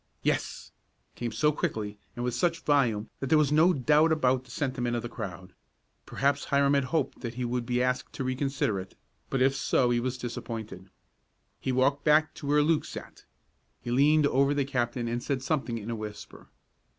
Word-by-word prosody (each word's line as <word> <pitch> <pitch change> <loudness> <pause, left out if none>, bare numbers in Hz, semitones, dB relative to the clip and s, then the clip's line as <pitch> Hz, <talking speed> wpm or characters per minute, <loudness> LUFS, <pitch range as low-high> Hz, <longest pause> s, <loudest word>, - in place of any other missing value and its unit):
"Yes!" - - -2 0.4
came 120 -1 -4
so 150 +8 +2
quickly 105 -7 -3 0.2
and 120 - -3
with 125 - -1
such 165 +7 0
volume 120 -8 +1
that 135 - -3
there 155 - +4
was 150 -2 +3
no 160 +4 +5
doubt 150 +2 +3
about 130 -4 +2
the - - -19
sentiment 125 -2 -2
of 120 - -2
the 120 - -5
crowd. 90 -4 -7 0.5
Perhaps 140 +1 0
Hiram 140 0 +3
had 140 -2 +2
hoped 140 +2 -1
that 120 -2 -5
he 125 0 -2
would 120 -1 -2
be 125 0 +1
asked 125 0 -1
to - - -4
reconsider 130 -5 -1
it, 95 0 -9 0.3
but 135 -1 +1
if 135 +1 +3
so 125 -2 +2
he 120 - +2
was 125 +1 -2
disappointed. 110 -6 -6 0.7
He 130 - -2
walked 135 +3 +2
back 155 0 +4
to 140 - -8
where 145 +1 +4
Luke 160 0 +2
sat. - - -10 0.5
He 120 - -5
leaned 145 +4 +4
over 140 +1 +3
the 140 -2 +1
captain 120 -3 -1
and 120 +1 -2
said 135 -1 -2
something 130 -5 -1
in 110 +1 -5
a - - -2
whisper. 105 -1 -9
130 Hz, 195 wpm, -28 LUFS, 120-145 Hz, 0.7 s, no